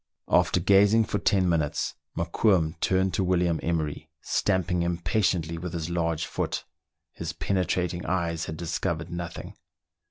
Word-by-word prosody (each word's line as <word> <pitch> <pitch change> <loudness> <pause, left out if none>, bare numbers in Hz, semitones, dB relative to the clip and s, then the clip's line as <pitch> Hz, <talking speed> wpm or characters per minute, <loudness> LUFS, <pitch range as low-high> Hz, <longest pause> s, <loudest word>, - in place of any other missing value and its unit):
After - - +3
gazing 100 +4 +5
for 105 - -2
ten 95 -2 +2
minutes, 80 -4 0 0.2
Mokoum 85 -1 +2
turned 95 -1 +2
to 95 - +1
William 90 -2 +1
Emery, 80 -2 -2
stamping 95 -2 +1
impatiently 85 -1 0
with 90 0 -5
his 85 0 -3
large 85 -2 0
foot; - - -3 0.5
his - - -5
pene 100 - -1
trating 90 -1 -1
eyes 85 -3 -1
had 80 - -6
discovered 85 0 -2
nothing. 85 0 -6
85 Hz, 135 wpm, -27 LUFS, 85-95 Hz, 0.5 s, gazing